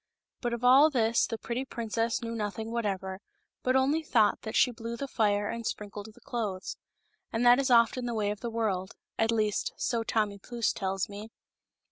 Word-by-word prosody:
But 240 -1 -1
of 235 0 -4
all 265 +5 +7
this 230 -5 +2
the 225 - -4
pretty 235 +3 -3
princess 230 -2 -2
knew 230 0 -4
nothing 220 0 -4
whatever, 195 -5 -2 0.4
but 255 +1 +1
only 275 +5 +3
thought 225 -8 +2
that 220 - -6
she 250 - +4
blew 230 0 -6
the 275 - -4
fire 205 -4 +1
and 230 0 -4
sprinkled 210 -1 -5
the 245 +3 -21
clothes. 210 -6 -4 0.6
And 230 +2 0
that 245 +2 +7
is 275 -1 +1
often 245 +1 +4
the 235 - -2
way 205 -2 0
of 210 - -5
the 235 - -4
world 205 -5 -2
— - - -31
at 225 - +2
least, 215 -2 0
so 235 -2 0
Tommy 210 -3 -1
Pfouce 235 +2 -1
tells 195 -2 -2
me. 205 +2 -8
225 Hz, 195 wpm, -29 LUFS, 210-240 Hz, 0.6 s, all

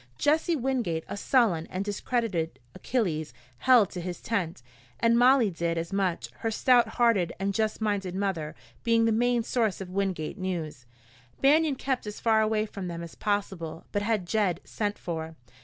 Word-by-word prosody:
Jesse 320 +3 +2
Wingate, 240 - -1
a - - -5
sullen 200 -7 +2
and 190 +2 -4
discredited 205 -5 -1 0.2
Achilles, 160 - -2 0.2
held 245 -6 +5
to 180 - -5
his 175 0 -5
tent, 180 - -2 0.4
and 230 0 +4
Molly 245 -3 +5
did 170 0 -2
as 165 +2 -3
much, 190 -3 -1
her 225 - -1
stout 240 +2 +4
hearted 230 -8 +3
and 195 +1 -1
just 220 +2 -1
minded 200 -4 -1
mother 190 -6 -2 0.3
being 230 -1 +3
the 225 - +3
main 240 +1 +2
source 225 -4 0
of 185 -2 -7
Wingate 190 -2 -2
news. 165 -9 -4 0.5
Banion 295 +1 +4
kept 260 -3 -2
as 210 - -6
far 220 -1 +3
away 215 0 +1
from 195 -3 -6
them 170 -1 -5
as 170 - -9
possible, 190 -6 -3
but 205 - 0
had 210 -3 0
Jed 185 -3 +1
sent 205 -1 -3
for. 160 -2 -5
205 Hz, 170 wpm, -28 LUFS, 175-230 Hz, 0.5 s, held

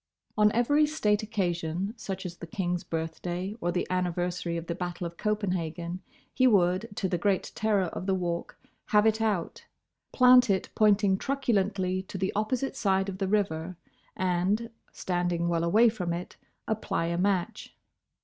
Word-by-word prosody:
On 210 0 +4
every 290 +6 +3
state 210 -9 +1
occasion, 185 -2 -2
such 190 -4 -6
as 175 -1 -6
the 170 - -8
King's 180 -2 -2
birthday, 175 +4 -4
or 175 - 0
the 175 - -1
anniversary 175 -1 -1
of 165 - -5
the 170 - -3
Battle 175 0 -4
of 170 0 -6
Copenhagen, 180 -4 -2 0.3
he 255 - +4
would, 190 0 +3
to 195 - -1
the 175 -2 -1
great 195 +1 0
terror 210 -3 +1
of 180 +1 -5
the 190 - +2
Walk, 175 -2 -3 0.3
have 210 -2 +4
it 220 0 +2
out, 205 -6 -2 0.4
plant 250 -2 +6
it 190 -1 +1
pointing 205 -2 +3
truculently 200 -8 0
to 190 +1 -8
the 190 +1 -1
opposite 250 +6 -1
side 195 -4 +1
of 190 -1 -6
the 195 - 0
river 185 -4 -1 0.4
and, 185 +5 0 0.2
standing 175 -1 -1
well 170 -1 +1
away 215 +8 +5
from 180 -7 -1
it, 175 +1 -6 0.3
apply 220 -6 -1
a 170 0 -1
match. 195 +2 -1
190 Hz, 160 wpm, -28 LUFS, 175-210 Hz, 0.4 s, plant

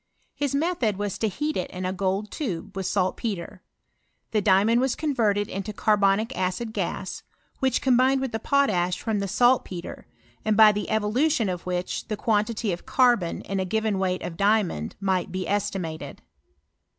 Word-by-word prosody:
His 285 -1 -1
method 280 - 0
was 205 -2 -3
to 220 - +1
heat 300 +9 -2
it 180 - -2
in 185 0 -5
a 185 - -1
gold 195 +2 -1
tube, 200 - -4
with 190 -1 -2
saltpetre. 190 -1 -2 0.7
"Hw 210 -2 +2
diamond 210 +5 +4
was 265 -1 +1
converted 220 -9 +1
into 200 +2 -5
caibonic 210 +3 +2
acid 185 +5 -2
gas, - - -3 0.4
which 265 -3 +1
combined 260 +1 +4
with 265 -2 -2
the 225 - -2
potash 205 - +1
from 220 -3 -1
the 200 - -2
saltpetre, 210 -4 0 0.4
and 215 -1 +1
by 215 -1 +9
the 210 0 -3
evolution 225 +3 +1
of 180 -1 -5
which 180 0 -3
the 215 -2 -3
quantity 215 0 0
of 175 - -8
catbon,.in 220 -6 +2
k 190 - 0
given 220 0 0
weight 185 -1 -1
of 165 - -6
diamond, 200 - +1
might 190 -2 0
be 185 -1 -3
estimated. 195 -6 -3
210 Hz, 160 wpm, -25 LUFS, 190-235 Hz, 0.7 s, by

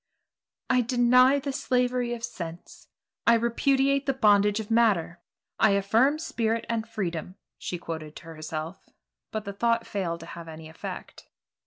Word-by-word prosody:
"I 250 -1 +3
deny 250 +2 +5
the 280 0 -3
slavery 250 -2 0
of 230 - -11
sense. 170 -8 -7 0.4
I 235 - +7
repudiate 270 +4 +2
the 275 - +1
bondage 205 -3 +4
of 220 0 -6
matter. 205 -7 +2 0.4
I 200 - +5
affirm 225 +9 +3
spirit 230 -7 -1
and 230 -1 -2
freedom," 180 -5 -4 0.2
she 180 - -4
quoted 160 -3 -7
to - - -10
herself, 160 +1 -7 0.4
but 215 -2 -4
the 200 - -5
thought 230 +3 +1
failed 170 -5 -3
to - - -9
have 170 0 -9
any 160 0 -9
effect. 160 - -8
220 Hz, 150 wpm, -27 LUFS, 170-245 Hz, 0.4 s, I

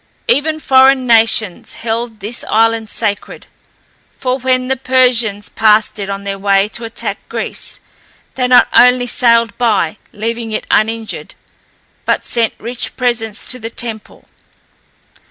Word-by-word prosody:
Even 310 +2 +1
foreign 265 -2 +4
nations 225 -4 +2
held 230 -1 -4
this 215 +4 -5
island 225 0 +2
sacred, 205 -2 -3 0.7
for 255 0 -2
when 255 0 0
the 265 - +1
Persians 245 -5 +1
passed 215 0 +2
it 200 -1 -4
on 200 0 -4
their 195 0 -4
way 195 0 +2
to 230 +1 -5
attack 225 - -4
Greece, - - -4 0.5
they 250 -1 0
not 250 0 +6
only 250 0 +5
sailed 230 -3 +2
by, 210 -9 +1
leaving 230 +1 -4
it - - -3
uninjured, 225 0 -1 0.7
but - - -1
sent 230 -2 0
rich 240 +2 -3
presents 230 -4 -2
to 255 - -6
the 225 -1 -6
temple. 230 -2 -6
230 Hz, 135 wpm, -15 LUFS, 215-250 Hz, 0.7 s, not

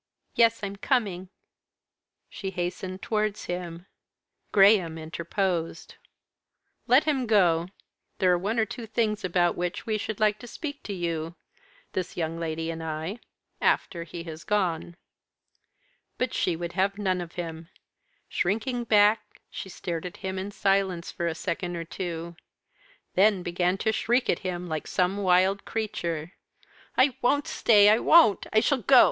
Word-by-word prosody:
"Yes, 230 -1 +3
I'm 200 0 -4
coming." 200 -6 0 1.0
She 195 - -6
hastened 185 +1 -4
towards 215 -1 -1
him. 175 -1 -5 0.7
Graham 195 -5 +5
interposed. 165 +1 -3 0.9
"Let 255 +5 +6
him 275 -5 0
go. 175 -6 +3 0.5
There 185 -2 +3
are - - +3
one 210 +6 -2
or 220 - +3
two 230 +1 -7
things 215 -1 0
about 175 -1 +2
which 175 0 -3
we 215 -1 -1
should 215 0 -4
like 215 -1 +2
to 245 - -10
speak 285 +3 -6
to 205 - -4
you, 170 -2 -3 0.6
this 185 -1 -4
young 165 -1 -2
lady 165 0 -3
and 165 0 -6
I, 160 +7 -4 0.4
after 170 -1 +1
he 170 +1 -8
has 160 -1 -8
gone." 175 -5 -1 1.2
But 255 -2 -1
she 180 - +1
would 170 +1 -5
have 195 +2 +1
none 185 -3 0
of 170 -1 -8
him. 165 -1 -6 0.6
Shrinking 235 +6 -1
back, 210 0 +5 0.3
she 190 - -7
stared 175 -1 -4
at 175 - -11
him, 190 0 -2
in 190 +2 -4
silence, 195 -3 0
for 170 - -3
a 165 - -2
second 175 +2 -3
or 165 -1 -4
two; 170 -1 -5 0.8
then 195 -1 +4
began 180 +1 0
to 220 - +1
shriek 240 +3 +1
at - - -2
him 180 -1 -4
like 155 -2 -4
some 185 +2 +1
wild 190 0 +3
creature. 175 -6 -3 0.6
"I 260 -1 +4
won't 285 +4 +2
stay! 205 -3 +5
I 215 +2 +6
won't! 315 -11 +5
I 220 - +4
shall 280 +3 +2
go! 255 +3 +6
185 Hz, 150 wpm, -27 LUFS, 170-215 Hz, 1.2 s, Let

